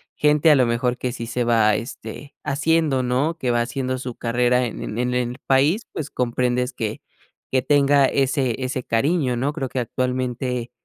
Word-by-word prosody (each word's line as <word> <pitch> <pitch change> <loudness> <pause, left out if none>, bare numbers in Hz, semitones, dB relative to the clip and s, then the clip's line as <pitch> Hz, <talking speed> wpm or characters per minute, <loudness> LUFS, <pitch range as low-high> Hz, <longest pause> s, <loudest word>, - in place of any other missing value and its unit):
gente 150 +1 +4
a - - +7
lo 130 -2 +4
mejor 120 +1 0
que 125 -1 -2
sí 115 - -5
se 120 +1 -1
va, 110 -3 +4
este, 140 +4 -7
haciendo, 155 -2 +1
¿no? 135 +7 0
Que 125 -5 -1
va 120 0 +2
haciendo 130 +1 -2
su 125 -2 -6
carrera 125 +1 +1
en 115 - -6
en 105 - -5
en 125 0 0 0.2
el 125 - -10
país, 145 - +3
pues, 145 -2 -4
comprendes 125 +1 -1
que 110 -3 -4 0.5
que 130 -1 +2
tenga 140 0 +4
ese 135 -2 +1
ese 130 0 -2
cariño, 135 +3 +1
¿no? 140 +4 -1
Creo 135 -4 -3
que - - -7
actualmente, 125 0 -2
130 Hz, 185 wpm, -22 LUFS, 120-140 Hz, 0.5 s, a